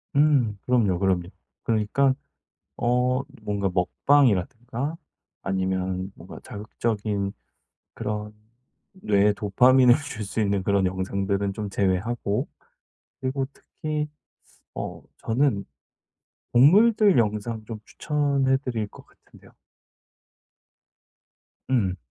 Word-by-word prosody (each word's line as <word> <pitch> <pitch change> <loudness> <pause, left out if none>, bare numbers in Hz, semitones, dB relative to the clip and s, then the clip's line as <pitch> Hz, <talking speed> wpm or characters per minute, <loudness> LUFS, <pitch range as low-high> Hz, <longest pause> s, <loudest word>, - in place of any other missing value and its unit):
음. 140 -8 +3
그럼요, 110 -8 +2
그럼요. 95 -3 +1 0.4
그러니까 115 +5 +2 0.6
어 125 +2 +1 0.2
뭔가 100 -2 -1
먹방이라든가 125 - +1 0.5
아니면 95 0 -1
뭔가 85 - -11
자극적인 105 -1 -3 0.6
그런 105 0 -4 0.6
뇌에 105 - +2
도파민을 125 +5 +5
줄 140 -8 -6
수 100 - -4
있는 100 -2 +1
그런 100 0 +2
영상들은 100 +2 -1
좀 105 0 -4
제외하고 100 +3 0 0.7
그리고 135 0 -1
특히 150 +1 -4 0.7
어 - - -5 0.2
저는 115 -3 +1 0.9
동물들 200 - +6
영상 110 0 0
좀 110 -1 -7
추천해 140 -3 +1
드릴 120 -6 -3
것 - - -15
같은데요. - - -21 2.2
음. 105 -8 +1
110 Hz, 210 characters per minute, -25 LUFS, 100-130 Hz, 2.2 s, 동물들